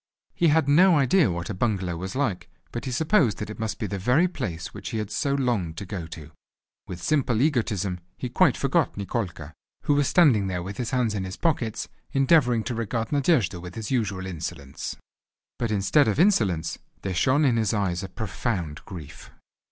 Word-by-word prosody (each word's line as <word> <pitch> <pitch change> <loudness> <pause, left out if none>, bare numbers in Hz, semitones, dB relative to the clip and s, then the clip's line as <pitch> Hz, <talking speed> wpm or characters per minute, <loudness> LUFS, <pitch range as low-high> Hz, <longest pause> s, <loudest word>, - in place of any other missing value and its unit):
He 170 - +2
had 155 -1 +3
no 170 +4 +6
idea 145 +5 +4
what 85 -1 -3
a - - -3
bungalow 95 -4 -1
was 95 +5 -5
like, 130 -10 -1 0.2
but 120 - -5
he 130 - -3
supposed 155 - +2
that 105 0 -5
it 105 - -9
must 110 -1 -2
be 115 - -3
the 100 -1 -4
very 125 - +3
place 85 - -5
which - - -7
he - - -3
had 105 -1 -3
so 140 +4 0
longed 110 -12 -1
to 100 - -5
go 90 -3 -5
to. 80 -2 -10 0.6
With 90 -1 -7
simple 130 -7 +1
egotism 110 - 0 0.2
he - - -3
quite - - +3
forgot - - +1
Nikolka, 90 -7 -4 0.3
who 145 - +2
was 145 -1 +2
standing 130 - +4
there 90 -2 -2
with 100 +2 -7
his 120 - -2
hands 125 -4 +1
in 100 -2 -2
his 95 0 -6
pockets 120 -9 -1 0.3
endeavouring 135 -4 +4
to 120 - -3
regard 115 0 -2
Nadejda 130 - +2
with 90 0 -9
his 110 0 -5
usual 105 -7 -1
insolence. 80 -5 -6 0.6
But 115 - 0
instead 105 +7 +3
of 110 +5 0
insolence 95 - +2 0.2
there 95 - -2
shone 135 - +3
in 120 -4 +3
his 110 -3 +1
eyes 95 -5 0
a 95 - -6
profound 95 -6 -3
grief. 85 -7 -10
110 Hz, 195 wpm, -25 LUFS, 95-135 Hz, 0.6 s, no